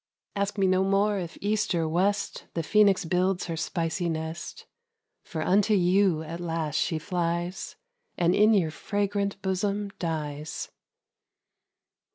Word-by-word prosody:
Ask 200 +1 -1
me 195 - +3
no 185 0 +3
more 200 +1 +2
if 170 -3 -6
east 210 -2 0
or 165 -1 +1
west 195 +5 0
The 165 - -1
Phoenix 200 +1 +4
builds 180 +2 +1
her 165 - -3
spicy 165 +1 -1
nest; 160 0 -5 0.6
For 160 -1 -4
unto 205 +4 +3
you 180 -3 +3
at 165 +2 -6
last 165 -3 -2
she 160 - +1
flies, 175 +1 -2 0.4
And 175 0 +3
in 215 +2 +5
your 170 -6 +2
fragrant 200 +2 -2
bosom 200 +2 -1
dies. 150 -3 -4
180 Hz, 135 wpm, -27 LUFS, 165-200 Hz, 0.6 s, in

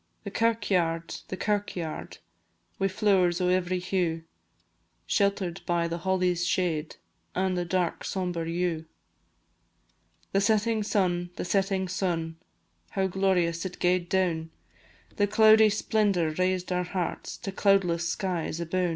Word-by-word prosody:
The 200 - -6
kirkyaird, 190 -8 0
the 185 - -5
kirkyaird, 200 -6 -3 0.6
Wi' 195 - +2
flowers 190 -3 +2
o' 180 -1 +1
every 185 0 +1
hue, 180 -3 -1 0.8
Shelter'd 195 -3 0
by 170 -1 +1
the 170 +1 -4
holly's 180 -1 +1
shade, 170 -4 0 0.4
An' 185 0 +1
the 175 -1 -1
dark 175 0 -1
sombre 175 -3 -2
yew. 170 -2 -1 1.5
The 195 - +2
setting 220 +2 +2
sun, 180 -4 0
the - - -4
setting 195 0 +1
sun, 170 -3 -2 0.5
How 190 - 0
glorious 180 -3 +1
it 185 -1 -5
gaed 180 -1 +1
down; 175 -4 0 0.7
The 205 - +3
cloudy 220 +1 +6
splendour 200 -5 +1
raised 185 +2 -1
our 180 0 +1
hearts 180 -1 -4
To 195 - -5
cloudless 180 -4 +2
skies 175 -4 -2
aboon! 175 +1 0
185 Hz, 125 wpm, -27 LUFS, 170-195 Hz, 1.5 s, cloudy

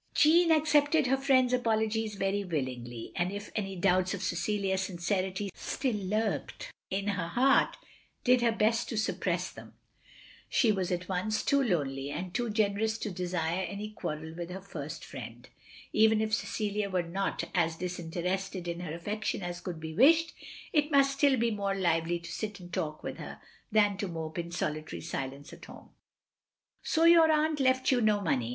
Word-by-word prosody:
" - - -39
Jeanne 335 +3 +5
accepted 300 -1 +4
her 260 +1 +3
friend's 265 -2 +3
apologies 220 -2 0
very 195 +1 0
willingly; 125 -8 -4
and 180 +1 0
if 205 0 -7
any 195 -3 -2
doubts 185 +1 +2
of 195 - -6
Cecilia's 190 +2 0
sincerity 190 +1 -2
still 265 -3 -2
lurked 210 +2 -2 0.2
in 195 +2 -1
her 180 -4 -1
heart, 260 +9 +3 0.5
did 250 -1 +4
her 235 -1 +3
best 225 +1 +1
to 225 - -3
suppress 220 - -1
them. - - -13 0.7
She 230 - +3
was 190 -3 -1
at 180 0 -2
once 200 +4 -1
too 280 -1 +3
lonely 140 - -1
and 175 +5 -5
too 240 +2 -1
gener 210 -1 +1
ous 220 0 +1
to 215 - -4
desire 180 -1 -1
any 210 +1 -6
qtiarrel 160 -4 -5
with 175 0 -5
her 185 +1 -5
first 155 -4 -7
friend. 120 -2 -9 0.5
Even 220 0 +5
if 215 0 -1
Cecilia 210 -1 -1
were 185 -2 0
not 190 +4 -2
as 165 -3 +1
disinterested 180 +2 -3
in 170 0 -3
her 175 -3 -5
affection 205 +3 -3
as 175 0 -5
could 175 -3 -5
be 160 0 -6
wished, 320 - +5 0.4
it 300 -2 +3
must 275 -2 +4
still 280 -2 +5
be 235 0 +1
more 200 -2 -1
lively 170 -2 +1
to 170 - -9
sit 210 -2 -4
and 175 -1 -12
talk 155 -1 -3
with - - -5
her, - - -8 0.3
than 205 -2 +3
to 200 - -2
mope 160 -2 -5
in 170 0 -4
solitary 155 -2 -3
silence 140 -3 -5
at - - -12
home. - - -13 0.5
" - - -64
So 325 - +1
your 330 -1 +7
aunt 310 0 +2
left 260 -1 +3
you 250 -2 +3
no 215 -2 +3
money. 130 - 0
195 Hz, 180 wpm, -30 LUFS, 175-225 Hz, 0.7 s, your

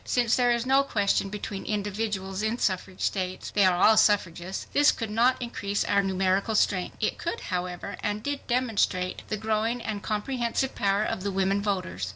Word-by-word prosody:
Since 240 -3 +2
there 245 -1 +3
is 235 0 +1
no 270 +1 +4
question 205 -6 0
between 205 -1 -5
individuals 205 -2 -3
in 220 +2 0
suffrage 185 -4 -2
states—they 185 +1 -1
are 185 -2 +4
all 215 +4 +5
suffragists—this 195 - +2
could 225 -3 -5
not 240 +4 +3
increase 205 -5 -2
our 200 - +2
numerical 195 +2 0
strength. 185 -3 +1
It - - -1
could, 465 - -3
however, 180 +2 -4
and 205 +1 -2
did 285 -1 -4
demonstrate 225 -7 0
the 215 - -2
growing 220 +3 0
and 215 -3 -4
comprehensive 240 +4 -1
power 200 +1 +1
of 190 - -2
the 200 +1 -2
women 195 +1 +1
voters. 180 - -2
205 Hz, 170 wpm, -27 LUFS, 190-230 Hz, -, all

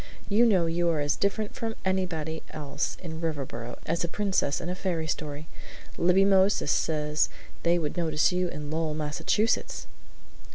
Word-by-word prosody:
"You 225 +4 +5
know 185 -6 +4
you 170 +1 +1
are 160 -2 +1
as 145 0 +1
different 205 +1 0
from 225 -1 -3
anybody 165 -4 -1
else 145 0 -3
in 160 -2 -6
Riverboro 135 -7 -4
as 165 +2 0
a - - 0
princess 190 -6 0
in 170 - -5
a 180 - -1
fairy 180 -3 -2
story. 150 -1 -3 0.5
Libby 180 +3 +4
Moses 195 -4 +4
says 150 -1 +1 0.3
they 170 +1 +3
would 155 -3 -2
notice 160 -2 +2
you 180 0 +1
in 150 -3 -6
Lowell, 160 -1 -1
Massachusetts!" 155 +9 0
165 Hz, 160 wpm, -28 LUFS, 150-185 Hz, 0.5 s, You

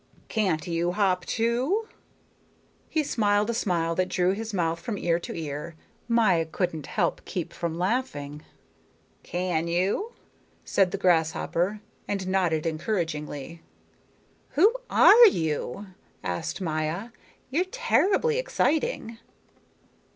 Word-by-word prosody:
Can't 190 -8 0
you 170 0 -1
hop, 185 -3 +1
too?" 255 - 0 1.0
He 315 - +1
smiled 210 -4 +1
a - - -3
smile 170 -7 0
that 185 +2 0
drew 180 0 +2
his 220 +3 -4
mouth 170 -4 0
from 200 +5 -4
ear 170 -2 +1
to - - -7
ear. 155 +1 -5 0.3
Maya 215 -9 +3
couldn't 160 -2 -3 0.4
keep 175 -4 -4
from 170 -1 -3
laughing. 175 - -2 0.8
"Can 175 -2 -2
you?" 190 - 0 0.5
said 195 -2 +3
the 195 - -3
grasshopper, 175 +2 +1 0.3
and 195 -2 -2
nodded 175 -5 +1
encouragingly. 160 -3 -3 1.0
"Who 410 +9 +6 0.2
are 470 +1 +8
you?" 160 - -1 0.4
asked 90 - -3
Maya. 160 +5 -2 0.4
"You're 340 +7 +1
terribly 470 +1 +2
exciting." 320 - -1
185 Hz, 110 wpm, -26 LUFS, 165-225 Hz, 1.0 s, are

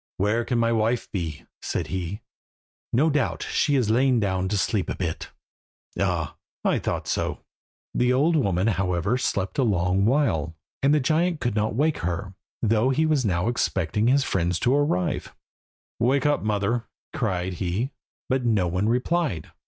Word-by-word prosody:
"Where 105 +4 +1
can 125 - 0
my 115 0 +2
wife 115 +1 0
be?" 80 -7 -4 0.2
said - - -2
he. 95 +3 -4 0.7
"No 150 +7 +3
doubt 145 -4 0
she 145 -2 +1
has 120 -5 +2
lain 125 +1 +3
down 95 -3 0
to 105 - 0
sleep 95 -1 0
a - - -2
bit. 85 -4 -4 0.7
Ah! - - -1 0.3
I - - +3
thought - - -3
so." - - -2 0.5
The 125 0 +2
old 150 +6 +3
woman, 100 - +1
however, 95 +2 0
slept 100 -1 -1
a - - +4
long 95 -2 +2
while, 105 - +1 0.3
and 140 - +4
the 150 - +4
giant 160 +4 +1
could 120 -3 -1
not 110 0 0
wake 150 +4 +1
her, 90 +2 -3 0.3
though 115 +3 +3
he 155 +4 +2
was 155 -4 +2
now 90 -1 +1
expecting 105 -3 0
his 135 +2 +4
friends 90 -5 0
to 125 - +3
arrive. 140 -11 0 0.6
"Wake 130 +3 +2
up, 145 0 +2
mother," 110 +3 0 0.3
cried 95 -5 -1
he, 100 +9 -1 0.4
but 130 -1 0
no 110 -6 +2
one 90 +5 0
replied. 125 - 0
110 Hz, 165 wpm, -25 LUFS, 95-130 Hz, 0.7 s, a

